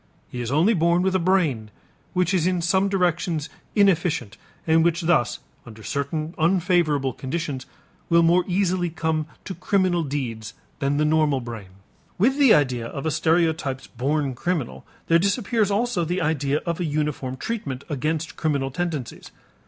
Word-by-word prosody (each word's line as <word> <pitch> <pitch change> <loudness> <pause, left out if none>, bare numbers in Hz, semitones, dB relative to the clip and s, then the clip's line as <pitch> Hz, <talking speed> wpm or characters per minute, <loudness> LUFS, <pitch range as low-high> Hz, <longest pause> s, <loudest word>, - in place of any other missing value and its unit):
He 125 - -4
is 120 0 -4
only 165 +10 +4
born 170 0 +2
with 190 0 +1
a 190 - +2
brain 165 - +1 0.4
which 180 0 +1
is 180 -2 +2
in 180 -2 0
some 190 +3 +2
directions 175 -4 0 0.3
inefficient 165 - +2 0.3
and 160 0 +4
which 170 0 +1
thus, 165 -9 +2 0.3
under 110 -2 -12
certain 155 +5 -3
unfavorable 165 -6 +2
conditions, 135 -1 -4 0.4
will 170 0 +5
more 175 +2 +4
easily 180 -1 +1
come 160 -1 -1 0.2
to 190 - -5
criminal 185 -1 +1
deeds 120 -7 -4 0.2
than 140 0 0
the 150 - +2
normal 150 -3 +2
brain. 115 -6 -8 0.5
With 265 +9 +2
the 275 -5 +6
idea 125 - +3
of 140 +4 -6
a 160 - +1
stereotyped 160 -5 0
born 140 +2 0
criminal 150 0 -3 0.2
there 165 0 +4
disappears 205 +2 +1
also 205 -2 0
the 175 +3 -1
idea 150 -3 0
of 170 0 -2
a 175 - -1
uniform 150 -4 -2
treatment 140 - -4
against 155 +2 -2
criminal 140 -4 -1
tendencies. 155 -4 -4
160 Hz, 155 wpm, -23 LUFS, 140-180 Hz, 0.5 s, the